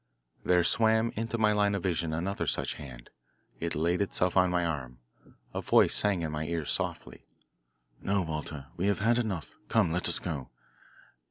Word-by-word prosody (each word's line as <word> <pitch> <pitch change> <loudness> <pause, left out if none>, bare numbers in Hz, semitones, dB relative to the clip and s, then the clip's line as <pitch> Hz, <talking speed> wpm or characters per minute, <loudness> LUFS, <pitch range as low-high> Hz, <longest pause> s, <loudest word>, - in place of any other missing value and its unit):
There 90 -1 +4
swam 110 +4 +3
into 115 +2 -2
my 110 -1 +3
line 105 -1 +2
of 100 - -3
vision 85 -3 0
another 90 +5 -2
such - - 0
hand. 65 -4 -11 0.5
It 85 0 -2
laid 85 +5 +1
itself 90 -2 0
on 90 -1 +5
my 90 -1 +1
arm. 70 -7 -4 0.6
A - - -2
voice - - +4
sang 100 -5 +2
in 80 - -2
my 75 0 -3
ear 85 -2 -2
softly: - - -3 0.7
"No, 100 -1 +1
Walter, 75 -3 -5
we 90 +3 0
have 100 0 +1
had 120 +3 +3
enough. 100 -9 -4
Come, 105 -8 +3
let 90 +1 0
us 85 - +1
go. 75 -7 -5
90 Hz, 175 wpm, -29 LUFS, 80-100 Hz, 0.7 s, on